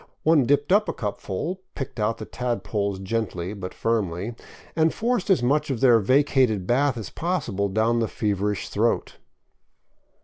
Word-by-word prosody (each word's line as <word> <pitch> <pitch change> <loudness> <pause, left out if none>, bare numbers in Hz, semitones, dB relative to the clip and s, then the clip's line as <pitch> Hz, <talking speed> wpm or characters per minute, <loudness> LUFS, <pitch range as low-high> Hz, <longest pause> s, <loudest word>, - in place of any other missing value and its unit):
One 155 -6 +4
dipped 145 +3 +2
up 210 +2 +4
a - - -1
cupful, 115 - -4
picked 135 -4 -6
out 105 +2 0
the 110 - -7
tadpoles 105 -5 -2
gently 95 -2 -3
but 95 -3 -6
firmly, 105 -2 -1 0.4
and 160 0 +3
forced 235 -3 -1
as 180 -11 +4
much 150 +4 +1
of 130 -4 -1
their 120 -3 +6
vacated 130 -3 +2
bath 135 +4 +2
as 110 -5 -6
possible 125 - -1
down 110 +4 +1
the 115 - +1
feverish 105 -2 -2
throat. - - 0
115 Hz, 150 wpm, -24 LUFS, 100-145 Hz, 0.4 s, their